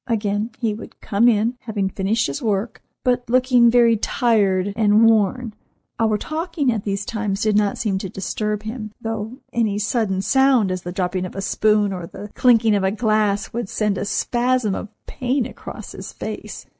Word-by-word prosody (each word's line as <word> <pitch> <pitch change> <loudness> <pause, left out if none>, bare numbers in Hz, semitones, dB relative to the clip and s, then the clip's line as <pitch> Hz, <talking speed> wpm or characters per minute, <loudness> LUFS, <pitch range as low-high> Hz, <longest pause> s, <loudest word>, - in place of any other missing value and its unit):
Again, 210 -2 -1
he 225 -3 -1
would 210 - -10
come 215 +4 +2
in, 230 +2 +2
having 210 -5 -2
finished 200 +4 0
his 140 - -4
work, 210 0 -2 0.2
but 245 -2 0
looking 250 -1 +4
very 235 -1 +5
tired 205 -4 +1
and 215 0 +5
worn. 225 +2 +2 0.5
Our 220 -2 +2
talking 310 - -1
at 215 -3 -3
these 200 0 -2
times 210 -3 -2
did 215 -1 +2
not 205 -1 +2
seem 195 -4 -1
to 190 - -5
disturb 210 +3 -3
him, 215 -1 -6
though 225 +1 -4 0.2
any 220 -4 +1
sudden 210 -3 0
sound, 260 -3 +3
as 185 0 -3
the 175 - -6
dropping 185 0 -2
of - - -13
a 195 - -3
spoon, 210 0 +2
or 180 -2 -6
the 205 +3 -10
clinking 230 -3 +4
of 200 -1 +1
a 190 - +3
glass, 215 -1 0
would 235 -3 -3
send 210 -2 0
a - - -2
spasm 240 0 0
of 210 - -5 0.2
pain 255 0 -1
across - - -9
his - - -8
face. - - -7
215 Hz, 180 wpm, -21 LUFS, 200-235 Hz, 0.5 s, very